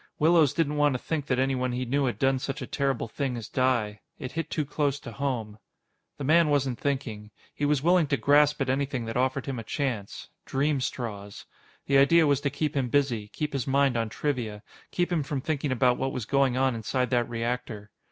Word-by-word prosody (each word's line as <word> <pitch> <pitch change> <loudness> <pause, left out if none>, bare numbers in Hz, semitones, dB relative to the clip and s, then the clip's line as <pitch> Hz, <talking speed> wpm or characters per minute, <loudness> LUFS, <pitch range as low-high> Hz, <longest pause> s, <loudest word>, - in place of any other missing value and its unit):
Willows 160 -2 +4
didn't 150 -1 0
want 145 -1 +3
to - - 0
think 150 +2 -3
that 125 - +1
anyone 130 -1 0
he 125 +1 -2
knew 140 +3 +1
had 125 - -1
done 135 -1 +2
such 135 +2 -4
a 130 - -4
terrible 135 -3 -1
thing 130 +1 -3
as 115 - -6
die. 120 -6 0 0.2
It 130 - -6
hit 165 0 -4
too 150 - -1
close 145 -1 -1
to 120 - -9
home. 115 -6 -3 0.6
The - - -5
man 160 +3 +4
wasn't 135 -4 0
thinking. 120 -7 -3 0.2
He 145 - -2
was 145 -1 +1
willing 175 -1 +4
to 140 - +1
grasp 145 +1 +4
at 135 - 0
anything 135 -3 -1
that 115 - -5
offered 130 +2 0
him 135 -4 -4
a - - -6
chance 115 -5 -4
dream 140 +1 0
straws. 105 -6 -5 0.4
The 140 0 +4
idea 165 +4 +5
was 140 -2 +2
to 140 - 0
keep 150 +2 -2
him 130 -3 0
busy, 120 -6 +1
keep 150 +7 -4
his 135 -2 -2
mind 135 -1 +2
on 115 -1 0
trivia, 115 -6 -3 0.3
keep 175 0 -1
him 170 -3 +1
from 140 0 -3
thinking 145 0 -2
about 125 -1 +2
what 135 0 -1
was 125 - -4
going 135 0 +2
on 130 -1 +2
inside 125 +2 -2
that 120 -2 +1
reactor. 115 -3 -4
135 Hz, 215 wpm, -27 LUFS, 120-145 Hz, 0.6 s, idea